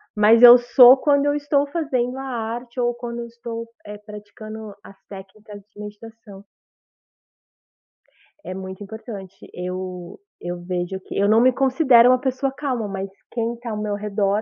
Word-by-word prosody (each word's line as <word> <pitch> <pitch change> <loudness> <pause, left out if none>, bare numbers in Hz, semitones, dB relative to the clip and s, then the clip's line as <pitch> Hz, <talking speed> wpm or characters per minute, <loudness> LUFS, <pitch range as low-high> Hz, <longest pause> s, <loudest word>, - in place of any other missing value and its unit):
mas 220 +3 +5
eu 245 0 +11
sou 245 +1 +7
quando 285 +1 +2
eu 290 - +2
estou 290 -1 0
fazendo 265 -5 -2
a 270 - -6
arte 240 0 -5
ou 240 0 +1
quando 235 0 -7
eu 235 - -5
estou, 230 0 -8 0.2
eh, 210 0 -8
praticando 210 0 -11
as 195 - -14
técnicas 205 +1 -12
de 205 - -11
meditação. 210 -1 -12 2.0
É 185 - -5
muito 190 +1 -8
importante, 200 -2 -9 0.2
eu 180 - -7 0.2
eu 175 0 -5
vejo 180 +1 -4
que - - -10
eu 200 +1 +2
não 220 +1 +5
me 255 +2 +4
considero 260 -2 +4
uma 255 - +4
pessoa 265 +1 -2
calma, 260 -6 -3
mas 195 0 -5 0.2
quem 235 0 -2
tá 240 - -7
ao 210 - -4
meu 210 -1 -3
redor. 205 0 -1
225 Hz, 160 wpm, -21 LUFS, 200-250 Hz, 2.0 s, eu